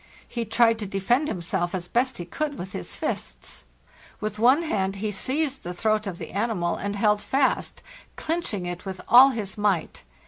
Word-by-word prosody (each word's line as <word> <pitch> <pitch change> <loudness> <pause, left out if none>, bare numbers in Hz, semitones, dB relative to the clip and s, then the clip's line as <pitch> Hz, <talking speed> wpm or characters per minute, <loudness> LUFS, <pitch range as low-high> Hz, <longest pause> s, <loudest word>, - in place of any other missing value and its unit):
He 235 -1 -3
tried 225 +1 +3
to 210 - -4
defend 220 +10 +1
himself 175 - -2
as 175 -1 -4
best 245 +4 +1
he 175 - -5
could 290 - -3
with 185 +1 -6
his 90 - -6
fists. - - -5 0.5
With 215 0 -4
one 260 +8 +5
hand 195 - -1
he 210 +2 -2
seized 270 +6 0
the 175 +1 -6
throat 215 +2 +1
of 185 -3 -4
the - - -7
animal, 200 -4 0
and 200 0 -3
held 210 0 +2
fast, 270 +3 0 0.3
clinching 315 - -2
it 175 0 -5
with 190 -1 -6
all 255 +3 +9
his 215 -5 -4
might. 200 -6 0
210 Hz, 180 wpm, -25 LUFS, 190-245 Hz, 0.5 s, all